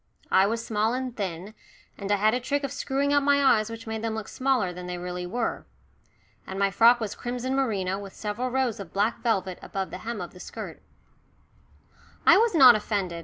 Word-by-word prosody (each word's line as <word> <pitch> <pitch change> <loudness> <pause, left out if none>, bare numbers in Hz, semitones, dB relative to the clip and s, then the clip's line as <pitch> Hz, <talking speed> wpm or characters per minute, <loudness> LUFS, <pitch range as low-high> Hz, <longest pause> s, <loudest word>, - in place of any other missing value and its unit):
I 190 +1 +5
was 230 +2 -2
small 220 +2 0
and 255 -2 -4
thin, 190 0 -5 0.4
and 200 0 -5
I - - +5
had 215 +2 +2
a 250 - +1
trick 285 +3 -2
of 275 - -3
screwing 280 0 -1
up 285 - +4
my 285 0 +3
eyes 220 -5 +4
which 230 0 -8
made 220 -1 -4
them 225 -1 -2
look 220 -1 -5
smaller 255 -9 0
than 180 0 -8
they 180 0 -4
really 180 0 -5
were. 230 +5 -3 0.8
And 190 - -6
my 200 0 +2
frock 235 +5 +5
was 215 -3 -3
crimson 245 +2 -4
merino 200 -8 0
with 200 -1 -10
several 215 +4 -3
rows 250 -3 -1
of 190 -5 -9
black 205 +4 0
velvet 190 -6 -1
above 195 -1 -4
the 180 - -6
hem 230 +3 -5
of 175 -2 -7
the 180 - -13
skirt. - - -8 1.4
I - - +8
was 455 -4 +2
not 260 -6 +9
offended. 200 -5 -2
220 Hz, 210 wpm, -26 LUFS, 195-250 Hz, 1.4 s, not